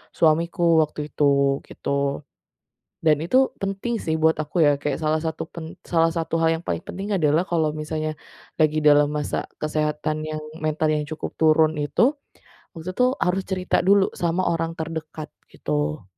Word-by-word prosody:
suamiku 170 +1 +3
waktu 150 0 -6
itu, 140 -1 +2
gitu. 140 +1 -2 0.8
Dan 150 -2 +4
itu 260 +10 +3
penting 195 +4 -2
sih 160 - -1
buat 160 0 +3
aku 150 +3 -6
ya, 145 - +6
kayak 145 -2 -2
salah 155 +1 +1
satu 160 0 -3
pen 165 +1 -8
salah 165 -1 +2
satu 165 -1 -2
hal 165 - +3
yang 170 - -14
paling - - -2
penting 200 +2 -5
adalah 155 -3 +3
kalau 160 -3 +2
misalnya 155 0 -3 0.4
lagi 155 -1 +3
dalam 145 -1 +5
masa 150 -1 -2 0.2
kesehatan 155 0 -1
yang 155 0 -4 0.2
mentalnya 155 0 +1
yang 150 - -13
cukup 155 - -4
turun 155 0 +4
itu, 240 - +2 0.6
waktu 165 +2 -6
itu 250 +7 +2 0.2
harus 185 +2 +1
cerita 185 -1 -1
dulu 200 0 +5
sama 170 +1 0
orang 165 0 -2
terdekat, 160 -1 -6 0.2
gitu. 75 +1 -2
160 Hz, 160 wpm, -23 LUFS, 150-170 Hz, 0.8 s, ya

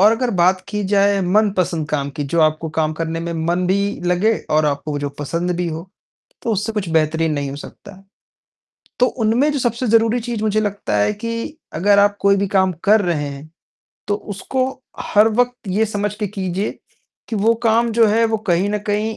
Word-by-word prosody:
और 210 +3 +7
अगर 240 +2 0
बात 185 -1 +3
की 210 0 -2
जाए 200 0 +3
मनपसंद 185 -4 +1
काम 140 -2 -2
की, 145 0 -4
जो 165 +4 0
आपको 155 +1 +2
काम 155 -1 0
करने 165 +1 -3
में 170 0 -4
मन 180 +1 +1
भी 200 +2 0
लगे 180 +5 +2 0.2
और 155 0 +3
आपको 145 +1 -2
वो 145 - -2
जो 145 0 -2
पसंद 170 +5 -2
भी 175 -1 -1
हो, 165 +3 -7 0.5
तो 230 - -1
उससे 210 +2 -1
कुछ 210 -4 -3
बेहतरीन 160 0 +1
नहीं 140 -2 -2
हो 140 - -6
सकता। 195 +6 -12 1.0
तो 250 - +6 0.2
उनमें 240 +7 +3
जो 290 - -1
सबसे 240 0 -1
ज़रूरी 230 +1 +3
चीज़ 235 -2 -4
मुझे 215 0 +1
लगता 205 - -2
है 105 - +2
कि 230 +8 -5 0.2
अगर 200 +4 +3
आप 205 0 +4
कोई 200 0 +4
भी 200 +1 0
काम 190 -1 +2
कर 215 +1 +5
रहे 160 -6 -1
हैं 140 +2 -9 0.6
तो 205 - +2 0.2
उसको 260 +6 -1 0.3
हर 210 +2 +4
वक़्त 245 0 -1
ये 205 +4 +2
समझ 210 -1 -2
के 210 0 -3
कीजिए 195 0 -3 0.5
कि 225 - -2
वो 220 +3 +3
काम 230 +1 +3
जो 230 0 +5
है 225 +2 +3
वो 220 0 0
कहीं 175 +4 +2
न 210 - 0
कहीं 210 +1 -1
200 Hz, 205 wpm, -19 LUFS, 165-220 Hz, 1.0 s, और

